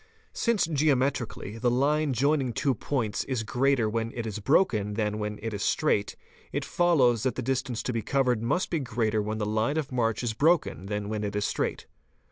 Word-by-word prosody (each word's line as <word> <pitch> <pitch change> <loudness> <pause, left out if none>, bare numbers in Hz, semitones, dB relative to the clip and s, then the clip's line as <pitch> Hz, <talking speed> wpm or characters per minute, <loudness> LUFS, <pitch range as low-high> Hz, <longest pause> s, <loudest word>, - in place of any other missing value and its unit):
'Since 230 -4 +1
geometrically 135 -8 0
the 120 +1 +2
line 145 +4 +2
joining 135 0 +1
two 135 +4 +1
points 115 -3 -2
is 125 -4 -2
greater 130 0 +2
when 115 +1 -2
it 120 - -3
is 110 -1 -4
broken 105 - +2
than 105 -1 -1
when 105 0 -3
it 115 -1 -3
is 100 - -4
straight, 105 -4 +1 0.4
1t - - -2
follows 135 -10 +3
that 130 -1 0
the - - -3
distance 130 -1 -2
to 125 - -2
be 115 - -1
covered 125 -2 +1
must 120 +11 0
be 165 - +1
greater 115 -4 0
when 110 +1 -3
the 105 - -1
line 110 +7 0
of 150 -4 -2
march 115 -2 0
is 115 -2 -1
broken 150 - +1
than 105 0 -3
when 105 0 -3
it 100 0 -3
is 105 - 0
straight. - - -2
120 Hz, 200 wpm, -27 LUFS, 110-140 Hz, 0.4 s, follows